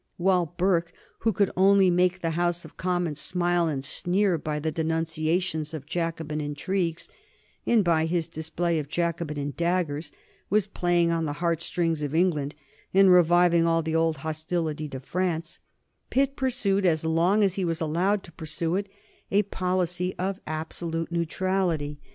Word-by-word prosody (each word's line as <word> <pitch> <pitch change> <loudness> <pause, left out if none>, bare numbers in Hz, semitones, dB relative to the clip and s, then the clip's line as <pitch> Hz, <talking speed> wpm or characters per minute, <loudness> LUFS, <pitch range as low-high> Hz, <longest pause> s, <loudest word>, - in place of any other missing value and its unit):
While 180 -2 +1
Burke, 175 -2 +1 0.3
who 225 - +2
could 200 -1 +1
only 195 0 +5
make 180 +1 +2
the 165 - 0
House 175 +1 0
of - - -13
Commons 175 -4 -1
smile 175 0 +1
and 140 -3 -3
sneer 180 +3 +1
by 150 0 -3
his 155 +1 -2
denunciations 160 0 -1
of 145 -3 -7
Jacobin 165 -2 -3
intrigues 165 +3 -2 0.6
and 225 -5 +4 0.2
his 170 -2 0
display 160 +1 -2
of 145 -2 -6
Jacobin 155 -4 -2
daggers, 170 -4 -1 0.4
was 210 -1 +3
playing 175 -4 +1
on 165 -1 0
the 145 - -2
heart 170 -1 0
strings 165 -3 -1
of 145 +1 -3
England 160 -5 +1 0.4
and 195 -1 +7
reviving 175 -1 +5
all 165 0 +2
the 160 +1 -2
old 165 -1 +2
hostility 155 -1 -2
to 135 - -6
France, 165 +3 -2 0.5
Pitt 275 +1 +1
pursued 225 -7 0
as 165 -3 +2
long 170 +6 +3
as 195 -3 +2
he 195 - -2
was 165 -2 -1
allowed 180 +5 +1
to 170 - -12
pursue 160 +1 -3
it 200 0 -3 0.4
a 205 +2 +3
policy 180 -1 -1
of 190 +1 -2
absolute 165 +1 -3
neutrality. 170 -3 -1
170 Hz, 155 wpm, -26 LUFS, 160-185 Hz, 0.6 s, and